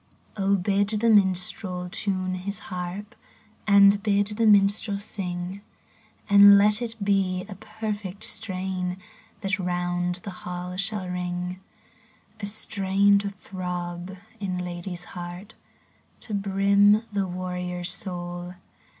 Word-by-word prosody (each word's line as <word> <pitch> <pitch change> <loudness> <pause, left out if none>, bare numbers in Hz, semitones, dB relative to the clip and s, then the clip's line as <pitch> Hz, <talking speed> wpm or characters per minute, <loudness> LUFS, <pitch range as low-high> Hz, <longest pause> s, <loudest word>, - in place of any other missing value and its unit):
BID 200 +1 +1
the 230 +1 +4
minstrel 185 -2 +1
tune 185 0 -2
his 190 +3 -4
haxp, 180 +3 -5 0.5
And 200 0 +7
bid 205 -1 +2
the 220 +1 +1
minstrel 205 0 +4
sing; 185 -2 -5 0.7
And 200 0 +9
let 210 +2 +4
it 230 -1 -3
be 190 -2 +1
a 205 - -7
perfect 210 -1 -5
strain 185 -2 -3 0.4
That 195 -1 -1
round 175 0 -1
the 200 - -5
hall 180 0 -5
shall 195 0 -3
ring: 180 0 -3 0.8
A 205 - -3
strain 200 -1 +2
to 200 0 -2
throb 180 -1 -6 0.2
in 190 -3 -2
lad/s 180 0 -5
heart, 180 +4 -8 0.7
To 215 - -7
brim 200 +2 +4
the 200 -2 0
warrior's 180 -1 -3
soul. 175 -1 -4
190 Hz, 115 wpm, -26 LUFS, 180-200 Hz, 0.8 s, And